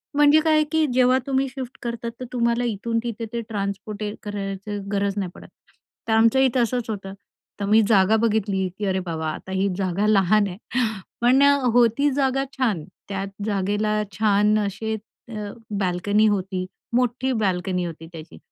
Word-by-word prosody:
म्हणजे 295 Hz, +1 st, +6 dB
काय 310 Hz, -1 st, +3 dB
की 320 Hz, -1 st, +3 dB
जेव्हा 255 Hz, 0 st, +4 dB
तुम्ही 270 Hz, 0 st, +1 dB
शिफ्ट 255 Hz, -1 st, -7 dB
करतात, 235 Hz, -1 st, -4 dB
तर 255 Hz, -, -5 dB
तुम्हाला 235 Hz, 0 st, +1 dB
इथून 230 Hz, +1 st, -1 dB
तिथे 230 Hz, -1 st, -4 dB
ते 235 Hz, -, -1 dB
ट्रान्सपोर्ट 205 Hz, 0 st, -4 dB
करायची 205 Hz, 0 st, -4 dB
गरज 200 Hz, 0 st, 0 dB
नाही 185 Hz, -3 st, -2 dB
पडत. -, -, -12 dB, 0.6 s
तर 220 Hz, -, +1 dB
आमच्या 230 Hz, +4 st, +4 dB
इथं 255 Hz, -2 st, +3 dB
असंच 235 Hz, 0 st, -2 dB
होतं 195 Hz, -3 st, -5 dB, 0.5 s
तर 200 Hz, -, -1 dB
मी 220 Hz, +1 st, +6 dB
जागा 210 Hz, 0 st, +4 dB
बघितली, 210 Hz, -4 st, +1 dB
की 210 Hz, -, -3 dB
अरे 190 Hz, 0 st, +1 dB
बाबा, 160 Hz, -2 st, -3 dB
आता 190 Hz, -, -8 dB
ही 190 Hz, +1 st, +1 dB
जागा 190 Hz, +1 st, 0 dB
लहान 205 Hz, 0 st, +4 dB
आहे, 180 Hz, -1 st, -7 dB, 0.6 s
पण 255 Hz, +3 st, +5 dB, 0.3 s
होती 245 Hz, +4 st, +4 dB
जागा 270 Hz, -1 st, +1 dB
छान1 220 Hz, -, -1 dB, 0.3 s
त्यात 195 Hz, 0 st, -3 dB, 0.2 s
जागेला 210 Hz, +1 st, 0 dB
छान 210 Hz, +1 st, +3 dB
असे 210 Hz, +2 st, -2 dB, 0.4 s
अ, 210 Hz, -2 st, -5 dB, 0.3 s
बाल्कनी 200 Hz, +4 st, +2 dB
होती. 190 Hz, -2 st, -1 dB, 0.3 s
मोठी 250 Hz, +1 st, +1 dB
बाल्कनी 180 Hz, -2 st, 0 dB
होती 165 Hz, -1 st, -7 dB
त्याची, 165 Hz, -1 st, -11 dB
210 Hz, 160 wpm, -23 LUFS, 195-235 Hz, 0.6 s, म्हणजे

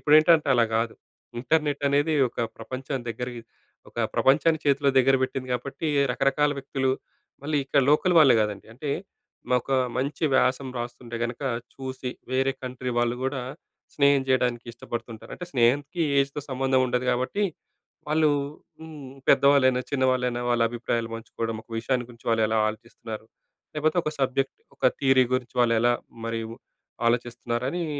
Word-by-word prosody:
ఇప్పుడేంటంటే 155 Hz, +1 st, +5 dB
అలా 120 Hz, -1 st, +4 dB
కాదు. 115 Hz, 0 st, -1 dB, 0.5 s
ఇంటర్‍నెట్ 145 Hz, +1 st, 0 dB
అనేది 145 Hz, +3 st, +2 dB, 0.2 s
ఒక -, -, -18 dB, 0.2 s
ప్రపంచం 130 Hz, +3 st, -5 dB
దగ్గరకి 120 Hz, +1 st, -5 dB, 0.5 s
ఒక -, -, -23 dB, 0.2 s
ప్రపంచాన్ని 160 Hz, +4 st, +3 dB
చేతిలో 140 Hz, 0 st, +3 dB
దగ్గర 135 Hz, +1 st, +5 dB
పెట్టింది. 130 Hz, 0 st, -3 dB
కాబట్టి, 140 Hz, +6 st, -4 dB, 0.2 s
రకరకాల 140 Hz, +3 st, +2 dB
వ్యక్తులు 135 Hz, -1 st, -1 dB, 0.5 s
మళ్ళీ 150 Hz, +1 st, -1 dB
ఇక్కడ 140 Hz, +1 st, +2 dB
లోకల్ 175 Hz, +4 st, +3 dB
వాళ్ళే 140 Hz, -6 st, +7 dB
కాదండి. 105 Hz, -2 st, -4 dB
అంటే, 140 Hz, +5 st, -5 dB, 0.7 s
ఒక 120 Hz, -, -12 dB, 0.3 s
మంచి 140 Hz, +5 st, -2 dB
వ్యాసం 130 Hz, +1 st, +2 dB
రాస్తుంటే 120 Hz, 0 st, -6 dB
గనక, 120 Hz, +3 st, -5 dB, 0.3 s
చూసి 130 Hz, -1 st, -5 dB, 0.2 s
వేరే 135 Hz, +1 st, +2 dB
కంట్రీ 125 Hz, 0 st, -4 dB
వాళ్ళు 120 Hz, 0 st, +1 dB
గూడా 130 Hz, 0 st, -2 dB, 0.5 s
స్నేహం 140 Hz, -1 st, +4 dB
చేయడానికి 125 Hz, -2 st, +1 dB
ఇష్టపడుతుంటారు. 115 Hz, -1 st, -7 dB
అంటే 180 Hz, -, -8 dB
స్నేహానికి 140 Hz, +7 st, +2 dB, 0.2 s
ఏజ్‌తో 140 Hz, +1 st, -2 dB
సంబంధం 130 Hz, 0 st, +2 dB
ఉండదు 125 Hz, 0 st, -1 dB
కాబట్టి, 130 Hz, +12 st, -1 dB, 0.6 s
వాళ్ళు, 155 Hz, 0 st, +3 dB, 0.5 s
హ్మ్, 150 Hz, -5 st, -10 dB, 0.2 s
పెద్దవాళ్ళైనా, 135 Hz, -2 st, +5 dB
చిన్నవాళ్ళైనా 130 Hz, -3 st, +1 dB
వాళ్ళ 120 Hz, -1 st, +2 dB
అభిప్రాయాలు 115 Hz, -1 st, -2 dB
పంచుకోవడం. 115 Hz, 0 st, -4 dB
ఒక -, -, -32 dB
విషయాన్ని 125 Hz, +1 st, -1 dB
గురించి 115 Hz, -1 st, -9 dB
వాళ్ళు 115 Hz, -1 st, +2 dB
ఎలా 110 Hz, 0 st, +1 dB
ఆలోచిస్తున్నారు, 110 Hz, 0 st, -8 dB, 0.5 s
లేకపోతే 155 Hz, +2 st, 0 dB
ఒక 155 Hz, -, -2 dB
సబ్జెక్ట్, 135 Hz, +1 st, 0 dB, 0.2 s
ఒక -, -, -8 dB, 0.2 s
థియరీ 135 Hz, -2 st, +5 dB
గురించి 125 Hz, -1 st, -3 dB
వాళ్ళు 120 Hz, -1 st, +4 dB
ఎలా, 120 Hz, +1 st, +4 dB, 0.3 s
మరి 115 Hz, 0 st, -2 dB, 0.7 s
ఆలోచిస్తున్నారనీ, 120 Hz, +6 st, -2 dB
130 Hz, 135 wpm, -26 LUFS, 120-140 Hz, 0.7 s, వాళ్ళే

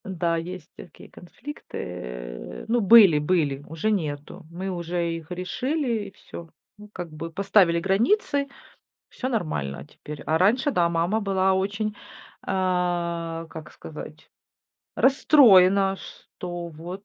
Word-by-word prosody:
М-да, 170 Hz, -3 st, -1 dB
есть 175 Hz, 0 st, -7 dB
такие -, -, -13 dB
конфликты. 265 Hz, -, -10 dB
Э, -, -, -7 dB
ну, 235 Hz, +1 st, +2 dB
были 200 Hz, -7 st, +8 dB
были, 150 Hz, -3 st, 0 dB
уже 165 Hz, +7 st, -1 dB
нету. 155 Hz, -2 st, -4 dB
Мы 185 Hz, +3 st, -5 dB
уже 170 Hz, -1 st, -2 dB
их 165 Hz, 0 st, -10 dB
решили 235 Hz, -, -2 dB
и -, -, -11 dB
всё, 170 Hz, -3 st, -11 dB, 0.3 s
ну, 210 Hz, 0 st, -12 dB
как 175 Hz, -3 st, -6 dB
бы 160 Hz, +2 st, -6 dB
поставили 190 Hz, -2 st, +3 dB
границы, 280 Hz, -, +1 dB, 0.6 s
всё 255 Hz, -, -4 dB
нормально 155 Hz, -, -3 dB
теперь. 150 Hz, 0 st, -10 dB
А 160 Hz, +1 st, +2 dB
раньше, 240 Hz, -, +3 dB
да, 175 Hz, -9 st, +2 dB
мама 170 Hz, +6 st, 0 dB
была 190 Hz, -2 st, +2 dB
очень, 205 Hz, +3 st, -1 dB, 0.5 s
а, 175 Hz, -3 st, -1 dB
как 155 Hz, -2 st, -9 dB
сказать, -, -, -10 dB, 0.7 s
расстроена, 200 Hz, -9 st, +5 dB
что 175 Hz, -2 st, -8 dB
вот 175 Hz, +5 st, -9 dB
180 Hz, 125 wpm, -25 LUFS, 165-205 Hz, 0.7 s, были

